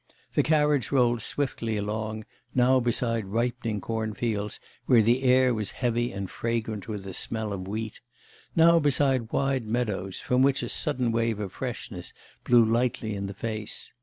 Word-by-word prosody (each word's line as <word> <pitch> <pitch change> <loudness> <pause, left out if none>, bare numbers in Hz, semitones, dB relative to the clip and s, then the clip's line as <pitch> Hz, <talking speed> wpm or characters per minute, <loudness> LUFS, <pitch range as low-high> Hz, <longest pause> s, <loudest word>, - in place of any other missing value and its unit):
The - - +4
carriage 150 -4 +2
rolled 120 -4 +3
swiftly 115 -5 -2
along, 110 +1 -3 0.3
now 130 +1 +5
beside 115 -2 0
ripening 115 0 -1
cornfields, 110 -1 -2 0.3
where 115 -3 +6
the 120 +4 +3
air 130 -1 +4
was 105 -3 -2
heavy 120 -1 -1
and 100 0 -4
fragrant 110 -2 -3
with 105 -3 -5
the 95 -1 -7
smell 110 0 -3
of 95 -1 -5
wheat; 110 +1 -5 0.5
now 170 +1 +6
beside 135 -5 +1
wide 135 -3 0
meadows, 105 -5 -2
from 125 +1 +1
which 135 -1 +3
a 120 - -3
sudden 125 -2 0
wave 115 -2 0
of 100 -3 -4
freshness 120 -8 -6 0.3
blew 120 -2 +6
lightly 115 -1 0
in 100 -1 -3
the 100 - -7
face. 110 0 -4
115 Hz, 160 wpm, -27 LUFS, 105-125 Hz, 0.5 s, where